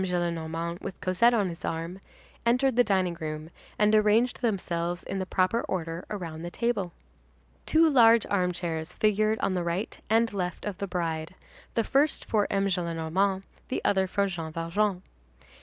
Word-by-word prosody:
Gillenormand 170 -1 -2
with 185 - -6
Cosette 215 +6 +3
on 205 -5 +1
his 165 - -8
arm, 165 +3 -3 0.4
entered 250 +2 +2
the 245 - +6
dining 190 -5 +1
room, 155 +1 -5 0.3
and 210 0 +3
arranged 215 +4 +3
themselves 175 -6 -1
in 195 - -4
the 190 - -3
proper 185 +6 +1
order 170 -2 -3
around 165 -6 -5
the 175 - -5
table. 210 -3 -1 0.8
Two 320 +1 +5
large 235 -6 +6
armchairs 180 -3 -1
figured 215 0 +2
on 190 - +1
the 180 -2 -1
right 175 +5 -3
and 225 0 +3
left 180 -3 -3
of 200 -2 -4
the 200 - -2
bride, 165 -1 -3 0.4
the 230 - +2
first 280 +6 +1
for 210 -2 +1
M. 195 0 +1
Gillenormand, 180 +1 0 0.2
the - - -3
other 190 -1 +3
for 200 +2 +1
Jean 170 -4 -4
Valjean. 180 +4 -1
185 Hz, 160 wpm, -28 LUFS, 170-215 Hz, 0.8 s, the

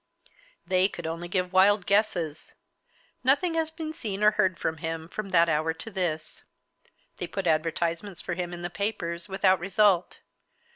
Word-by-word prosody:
They 185 +2 +3
could 170 -4 -7
only 165 +2 -4
give 180 0 -1
wild 195 +1 +5
guesses. 175 -7 0 0.7
Nothing 285 +7 +3
has 325 -1 0
been 320 -1 -6
seen 210 -8 -4
or 210 - +7
heard 190 -5 +1
of 160 -1 -1
him 160 0 -4
from 200 +3 -5
that 170 -2 +5
hour 160 0 +1
to 225 - -8
this. 175 -5 -3 0.8
They 175 - -4
put 195 +1 -4
advertisements 165 +3 0
for 175 - -3
him 175 0 -3
in 175 0 -7
the 175 - -3
papers, 175 -4 -3
without 190 -1 +3
result. 195 -1 +2
180 Hz, 160 wpm, -27 LUFS, 170-205 Hz, 0.8 s, or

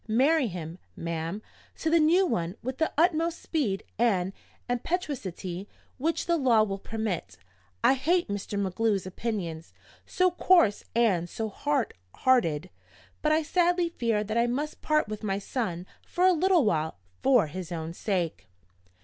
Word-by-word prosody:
Marry 270 +5 +3
him, 170 -2 -6 0.2
ma'am, 170 +4 -4 0.3
to - - -3
the 335 - +5
new 340 +5 +4
one 180 - -1
with 260 +2 -4
the 320 - +1
utmost 335 0 +2
speed 235 - -1 0.2
and 195 -5 +2 0.3
impetuosity 235 - -3 0.3
which 325 +5 0
the 340 -1 +2
law 240 -7 +4
will 195 -2 -3
permit.' 195 - -4 0.5
I - - +6
hate 340 +7 +1
Mr. 205 0 -3
MacGlue's 200 0 0
opinions 185 -5 -4 0.3
so 365 0 +2
coarse 345 - +4
and 190 -8 +2
so 220 +4 -3
hard 280 +4 -1 0.2
hearted! 185 - +2 0.5
but 305 - +2
I 315 +1 +3
sadly 350 +2 +2
fear 230 -9 0
that 215 +2 -1
I 235 - +3
must 290 +5 -3
part 305 -4 +2
with 215 0 -5
my 195 -3 -1
son 195 -4 -3 0.2
for 360 - +1
a 370 - +6
little 355 -3 +3
while, 160 - 0 0.2
for 255 -7 +5
his 175 +3 -7
own 165 -1 -4
sake. 175 - -2
225 Hz, 150 wpm, -28 LUFS, 185-305 Hz, 0.5 s, I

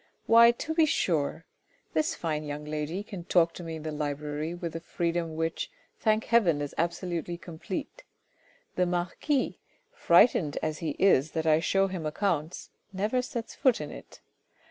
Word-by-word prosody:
" - - -44
Why 230 +1 +8
to 240 +6 -2
be 320 -1 +4
sure! 160 - 0 0.5
This 155 -1 +1
fine 155 -2 -2
young 150 0 -5
lady 155 +5 -3
can 195 -4 -8
talk 170 -1 +3
to 175 - -8
me 165 -1 -5
in 155 - -8
the 155 - -3
library 150 +2 -3
with 170 -2 -5
a - - -2
free 170 0 -2
dom 165 -2 -3
which, 165 +1 -2 0.3
thank 215 0 +2
heaven, 190 -10 +3
is 145 -1 -4
absolutely 170 0 -2
complete; 175 - -6 0.7
the 180 0 +2
marquis, 180 - -1 0.3
frightened 170 - +4
as 155 -1 -2
he 155 -3 -3
is 155 -6 +3
that 160 -1 -1
I 155 -1 +5
show 195 +4 +2
him 185 -5 -3
accounts, 160 -1 -2 0.2
never 210 +6 0
sets 240 -2 -5
foot 260 -4 +2
in 150 -1 -5
it. - - -12
170 Hz, 170 wpm, -28 LUFS, 155-195 Hz, 0.7 s, Why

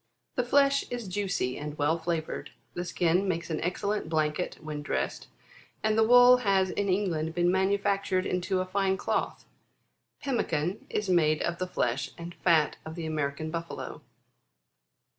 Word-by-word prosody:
17. 250 - +1
The - - -15
flesh 280 0 +4
is 240 -4 -4
juicy, 185 -9 -1
and 150 0 -6
well 150 +2 +2
flavoured. 165 -1 -3 0.2
The 175 - -4
skin 175 +2 +1
makes 170 -2 -2
an 155 - -2
excellent 195 +1 -2
blanket 155 +1 -1
when 155 -2 -5
dressed; 145 - -3 0.6
and 215 0 +2
the 220 - +5
wool 245 +2 +8
has 195 -5 +2
in 205 -1 -1
England 170 -5 0
been 175 0 +3
manufactured 195 0 +1
into 185 +1 0
a - - -2
fine 190 0 0
cloth. - - -2 0.7
Pemmican 185 - -1
is 210 - -2
made 155 -4 +3
of 170 0 -2
the 185 - -1
flesh 125 -6 -1
and 170 0 -7
fat 165 -4 +2
of 160 0 -8
the 170 -2 -5
American 155 0 -2
Buffalo. 165 0 -5
180 Hz, 160 wpm, -28 LUFS, 160-200 Hz, 0.7 s, wool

